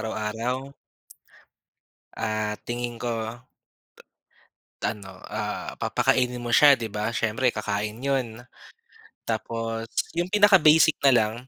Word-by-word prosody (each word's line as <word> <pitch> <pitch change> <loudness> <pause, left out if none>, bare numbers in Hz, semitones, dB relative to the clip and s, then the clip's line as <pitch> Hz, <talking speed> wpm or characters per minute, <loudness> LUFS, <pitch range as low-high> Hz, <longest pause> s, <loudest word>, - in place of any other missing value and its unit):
araw-araw. 115 +5 -3 1.4
Ah, 110 -1 -2
tingin 120 0 -4
ko. 120 - -1 1.7
Ta - - 0
ano, 100 -2 -11 0.2
ah, - - -4
papakainin 125 -1 +1
mo 120 - -3
siya 145 +3 +7
'di 115 -4 -6
ba 105 +2 -3
siyempre 115 +4 0
kakain 105 -2 -2
'yun. 125 -4 -2 0.8
Tapos 115 0 -3 0.2
'yung 175 +1 -1
pinaka-basic 185 -6 +5
na 140 - +5
lang, 110 -2 +2
120 Hz, 105 wpm, -25 LUFS, 110-135 Hz, 1.7 s, siya